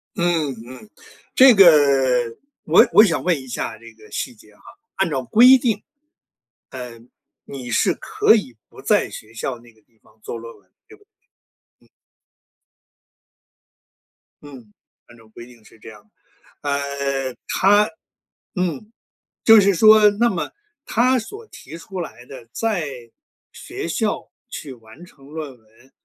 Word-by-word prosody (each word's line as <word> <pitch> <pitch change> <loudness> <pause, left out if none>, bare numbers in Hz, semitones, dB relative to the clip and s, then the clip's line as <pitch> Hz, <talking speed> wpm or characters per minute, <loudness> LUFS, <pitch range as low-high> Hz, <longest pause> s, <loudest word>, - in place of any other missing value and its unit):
嗯 170 -5 0 0.2
嗯， 130 +12 -13 0.4
这 260 -3 +7
个 190 -4 +8 0.9
我 160 - +5
我 210 +4 +8
想 165 -8 0
问 170 -5 +1
一 130 - -13
下 110 -2 -5
这 115 0 -14
个 110 -1 -19
细 - - -4
节 105 0 -21
哈。 - - -26 0.3
按 190 -3 0
照 135 -3 -3
规 245 - +6
定， 225 -5 -1 0.9
呃， 125 -3 -9 0.5
你 125 -3 -8
是 - - +1
可 430 - +2
以 130 - -4
不 - - -17
在 - - +1
学 110 +1 -12
校 120 +2 -5
那 120 -1 -20
个 110 - -29
地 115 +1 -39
方 - - -25
做 115 - -7
论 115 0 -11
文， - - -33 0.2
对 430 - -16
不 415 - -26
对？ 410 - -46 0.7
嗯。 - - -27 2.6
嗯， 125 -7 -14 0.3
按 120 - -18
照 115 - -20
规 120 +2 -12
定 120 -3 -19
是 110 - -21
这 - - -12
样 105 -2 -15
的。 105 - -37 0.6
呃， 140 -2 -3
他 205 +2 +3 0.7
嗯， 180 +3 -4 0.5
就 225 -2 +7
是 200 -1 +2
说， 215 +2 +6
那 230 +4 +1
么 180 - -4 0.3
他 255 +3 +2
所 415 - -10
提 160 - -12
出 185 +2 -7
来 120 -6 -10
的， 125 -3 -12
在 205 -9 -2 0.7
学 - - -7
校 - - -3 0.2
去 140 -4 -8
完 115 +8 -16
成 140 -5 -20
论 150 -3 -8
文， 115 +4 -26
145 Hz, 160 characters per minute, -20 LUFS, -, 2.6 s, 个